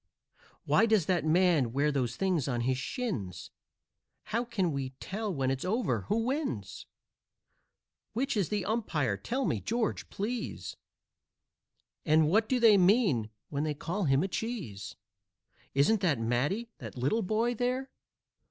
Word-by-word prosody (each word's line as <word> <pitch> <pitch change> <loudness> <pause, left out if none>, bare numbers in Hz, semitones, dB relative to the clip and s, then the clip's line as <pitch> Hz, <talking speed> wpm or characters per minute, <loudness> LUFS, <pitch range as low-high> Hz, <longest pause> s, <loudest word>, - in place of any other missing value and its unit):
"Why 225 - +4
does 215 -7 +3
that 175 -3 +1
man 160 -7 +3
wear 145 +3 +2
those 125 -4 -1
things 180 -3 0
on 120 -3 -1
his 130 +1 0
shins?" 120 - -4 0.7
"How 235 +2 -1
can 195 -8 -1
we 135 -2 -4
tell, 210 +2 -3
when 135 -5 0
it's 135 -1 -2
over, 185 - 0
who 225 +1 +1
wins?" 255 - -3 1.3
"Which 265 +4 -1
is 200 -6 +1
the 205 -3 -1
umpire? 160 - 0
Tell 255 - -2
me, - - 0
George, 230 -1 -2
please, 230 +5 -4 1.3
And 155 0 +4
what 215 +7 +2
do 255 - +2
they 220 -4 +7
mean 180 - +3 0.2
when 145 0 -2
they 155 -1 -1
call 175 +7 -2
him 135 +2 +3
a - - 0
cheese?" 190 - -5 0.8
"Isn't 175 +10 +3
that 165 -8 +2
Matty, 140 - -1
that - - -8
little 140 - +1
boy 220 +4 +1
there? 250 +3 -1
185 Hz, 145 wpm, -30 LUFS, 135-225 Hz, 1.3 s, they